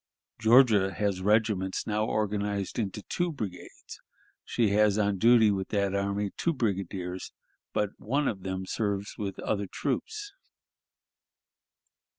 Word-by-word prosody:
Georgia 110 -4 +5
has 100 -2 -1
regiments 105 -2 +1
now 105 0 0
organized 105 -1 -1
into 105 -1 -3
two 175 -1 -1
brigades; 105 - -8 0.4
she 115 -3 +1
has 105 0 +3
on 100 -2 +1
duty 115 -1 +6
with 95 -1 -2
that 100 -2 0
army 100 0 -1
two 170 - +1
brigadiers, 95 - -3 0.4
but 105 -1 0
one 140 +5 0
of 95 -4 -2
them 95 0 -4
serves 100 0 -2
with 100 -2 -4
other 100 -2 -1
troops. 415 - -3
105 Hz, 125 wpm, -28 LUFS, 95-110 Hz, 0.4 s, duty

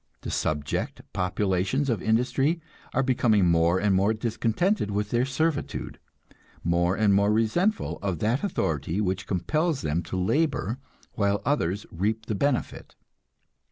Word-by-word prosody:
The - - -5
subject 75 -1 -2
populations 95 +8 0
of 115 -8 0
industry 135 +8 +1 0.3
are 135 - +1
becoming 115 -6 +3
more 85 +1 +3
and 100 0 +2
more 100 +4 +3
discontented 115 - 0
with 105 0 -2
their 120 +1 +2
servitude, 145 +3 -2 0.6
more 85 +2 +2
and 105 -1 +3
more 100 +1 +3
resentful 115 - +1
of 95 -4 -1
that 115 - 0
authority 80 - -1
which 95 -1 -1
compels 155 - 0
them 75 +3 0
to 95 - -2
labor 130 - 0 0.3
while 100 -1 +1
others 105 - 0
reap 105 +6 -1
the 110 - -2
benefit. 135 +5 -1
105 Hz, 135 wpm, -26 LUFS, 95-130 Hz, 0.6 s, becoming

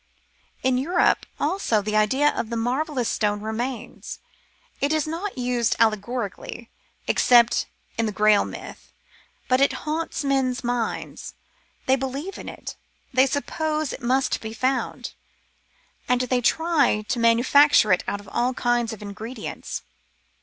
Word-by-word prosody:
In 255 -1 +2
Europe, 345 +7 +2
also, 290 - +1
the 215 +1 -2
idea 260 +8 +3
of 225 - -3
the 235 - -2
marvellous 255 +2 -1
s.tone 210 -1 0
remains; 225 +4 -5 0.6
it 280 - +1
is 310 -2 +1
not 335 +3 -4
used 245 -2 +1
allegorically, 225 +1 -1 0.3
except 235 -1 +4 0.3
in 225 - +2
the - - -1
Grail 210 0 +4
myth, - - -9 0.6
but 255 +1 +3
it 275 - +4
haunts 315 0 -2
men's 265 -3 0
minds; 240 -1 -3 0.5
they 265 - +4
believe 275 +8 -4
in - - -7
it, - - -8 0.4
they 260 +1 +5
suppose 305 +1 -2
it - - -8
must 260 +2 +1
be 220 0 -6
found, 255 +3 -1 1.0
and 250 0 +3
they 250 0 0
try 290 -5 +2
to 245 - -1
manufacture 235 0 +5
it 180 - +1
out 205 - -2
of 205 - -14
all 250 +1 0
kinds 240 -1 0
of 210 - -9
ingredients. 215 +3 -6
250 Hz, 140 wpm, -24 LUFS, 225-280 Hz, 1.0 s, they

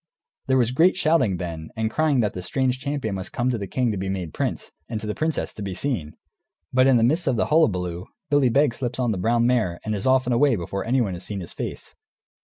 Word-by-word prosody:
There 130 0 +3
was 120 -2 +2
great 170 +8 +4
shouting, 155 - +2
then, 80 -3 -6
and 110 -1 -1
crying 150 -3 +2
that 105 -3 0
the 90 - -5
strange 130 +7 0
champion 140 -6 -3
must 95 -1 -5
come 125 +1 0
to 120 - -1
the 100 - -4
king 125 +3 0
to 105 - -3
be 95 0 -3
made 90 -5 -4
prince, - - -3 0.2
and 110 -2 -3
to 110 - -7
the 105 - -2
princess, 155 +5 -2
to - - -9
be 95 -2 -4
seen. 100 - -2 0.6
But 130 +1 +5
in 130 -2 +5
the 115 - +3
midst 155 +8 +2
of 130 - +2
the 115 - +1
hullabaloo 90 - +1 0.2
Billy 145 -3 +4
Begs 135 -1 +2
slips 125 -3 -3
on 125 -3 +1
the 100 - -2
brown 115 +4 +2
mare 115 -9 +1
and 110 - -1
is 100 +3 -2
off 130 0 +4
and 125 - 0
away 130 +1 +4
before 95 +1 -4
anyone 115 -5 +1
has 85 - -6
seen 100 -2 -4
his 85 - -6
face. - - -6
115 Hz, 250 wpm, -24 LUFS, 95-130 Hz, 0.6 s, But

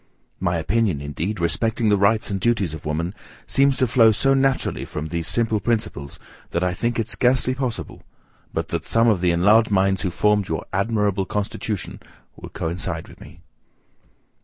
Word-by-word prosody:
My 85 -2 0
opinion, 95 0 0
indeed, 80 +8 -4
respecting 110 +8 0
the 105 - +5
rights 100 +2 +2
and 100 - -1
duties 105 -9 +1
of 80 -1 -7
woman, 85 +4 -2 0.3
seems 135 -1 +2
to 130 - +3
flow 115 -2 +5
so 135 +6 +2
naturally 135 0 +1
from 75 +1 -5
these 85 0 -2
simple 115 +1 +1
principles, 100 -10 -2 0.3
that 85 - -1
I 90 -1 0
think 120 +5 -2
it 115 -2 -1
scarcely 130 +1 +2
possible, 130 -3 -4 0.5
but 80 0 -3
that 85 -1 -3
some 115 +1 +3
of 105 -6 +3
the 90 - +2
enlarged 105 +7 +4
minds 95 -1 +2
who 95 - -1
formed 105 +2 +1
your 80 - -3
admirable 100 -1 0
constitution, 105 0 -3 0.4
will - - -10
coincide 85 +1 -4
with - - -16
me. - - -14
100 Hz, 170 wpm, -22 LUFS, 85-115 Hz, 0.5 s, the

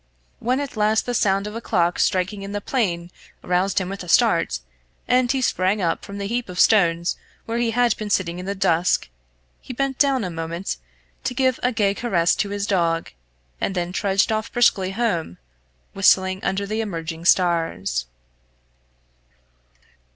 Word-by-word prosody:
When 250 +3 0
at 285 -3 -5
last 215 +1 +2
the 245 - -2
sound 195 -4 +2
of 210 +1 -6
a 230 - -4
clock 175 -6 +1
striking 190 +1 +1
in 200 +1 -6
the 205 - -1
plain 180 -7 -2 0.3
roused 180 +2 0
him 185 - -3
with 195 0 -6
a - - -10
start, 65 - +3 0.5
and 250 0 +3
he 265 -1 0
sprang 190 -1 +1
up 170 -3 -1
from 200 - -8
the 200 - -4
heap 235 +1 -2
of 180 0 -6
stones 170 -4 +3 0.3
where 230 +1 -2
he 240 -1 +1
had 240 0 +2
been 215 -1 -5
sitting 180 -3 0
in 180 - -7
the 200 - -2
dusk, 175 - +1 0.5
he 255 - -8
bent 270 +1 -2
down 270 -4 +3
a 180 - -3
moment 165 +3 -4 0.5
to 250 - -2
give 260 -1 +1
a 250 - +1
gay 205 -4 +1
caress 185 -7 +1
to 200 - -1
his 200 0 -2
dog, 170 -4 0 0.5
and 195 - -1
then 175 0 -2
trudged 195 +2 +1
off 220 0 -2
briskly 220 -6 +3
home, 190 - -2 0.6
whistling 190 -1 +3
under 200 +1 -1
the 215 +2 -2
emerging 165 -5 -5
stars. 165 - +1
195 Hz, 175 wpm, -22 LUFS, 175-225 Hz, 0.6 s, start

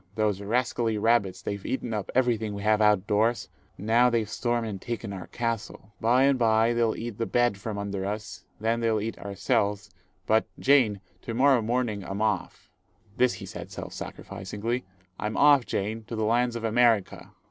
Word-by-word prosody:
Those 105 -2 0
rascally 115 +1 0
rabbits 105 -4 +1
they've 100 -1 -4
eaten 125 -3 -3
up 105 -3 -3
everything 115 -5 +1
we 100 - -6
have 110 0 +3
out 105 0 +6
of 95 - -15
doors, 110 +4 +1 0.3
now 115 +4 +3
they've 115 -3 0
stormed 120 +1 -1
and 100 -3 -6
taken 115 -4 -5
our 95 -2 -7
castle. 115 -3 -4
By 125 +4 +4
and 135 -1 +3
by 115 0 +3
they'll 115 -1 +1
eat 115 -2 -6
the 115 - -1
bed 120 -5 +1
from 105 +1 -5
under 100 -1 -3
us, 105 0 -5 0.2
then 115 +2 0
they'll 115 -2 +1
eat 110 +2 -4
ourselves; 100 0 -1 0.3
but, 110 0 +2
Jane, 125 -8 +3 0.2
to 115 - -5
morrow 130 0 +4
morning 115 -3 -1
I'm 95 +2 -5
off," 105 -3 -2 0.5
this 125 -1 +3
he - - -8
said - - -8
self - - -7
sacrificingly, 105 +5 -5 0.3
"I'm 105 0 -3
off, 145 -3 +5
Jane, 110 +3 -2
to 115 - -6
the 110 -1 -1
lands 120 +2 +1
of 115 - -5
America." 115 -2 +1
110 Hz, 180 wpm, -27 LUFS, 105-120 Hz, 0.5 s, out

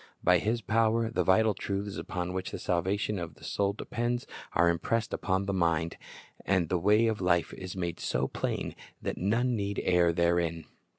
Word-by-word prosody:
By 90 0 +5
His 115 +5 0
power 115 +2 +2
the - - +1
vital 105 +3 +4
truths 100 +1 -3
upon 90 0 -4
which 95 0 -3
the - - -5
salvation 95 +3 0
of 85 -2 -6
the - - -18
soul 100 0 0
depends 120 +3 -2 0.3
are 85 - +4
impressed 105 +7 0
upon 95 +1 0
the 100 - -1
mind, 85 -2 +1 0.5
and 95 -4 +1
the 90 - +1
way 105 +5 +4
of 110 -3 0
life 85 -2 +2
is 95 -1 -7
made 85 -2 -3
so 65 +2 0
plain - - -3 0.3
that - - -3
none 120 +6 +1
need 100 -1 -2
err 90 -2 +4
therein. 85 -1 +1
95 Hz, 180 wpm, -29 LUFS, 85-105 Hz, 0.5 s, By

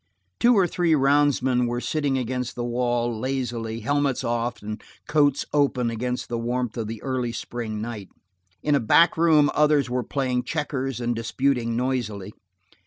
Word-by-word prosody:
Two 240 -1 +5
or 190 - +5
three 175 -1 +1
roundsmen 135 -3 +2
were 120 0 -2
sitting 145 0 -1
against 125 0 -3
the 120 - -3
wall, 120 -1 0
lazily, 120 -3 -3
helmets 145 +2 0
off 120 -1 -2
and 105 +1 -5 0.3
coats 145 -2 +2
open 135 -5 +2
against 125 +2 -3
the 120 -1 -3
warmth 120 0 -2
of 115 -3 -3
the 110 -1 -7
early 130 -3 -1
spring 115 -1 -5
night. 110 -4 -6 0.5
In 150 - +2
a 140 - +4
back 165 +8 +4
room 155 -3 +4
others 150 -4 +3
were 125 0 0
playing 125 0 -1
checkers 135 -3 -3
and 120 -1 -1
disputing 115 0 0
noisily. 110 -6 -2
125 Hz, 160 wpm, -24 LUFS, 120-140 Hz, 0.5 s, Two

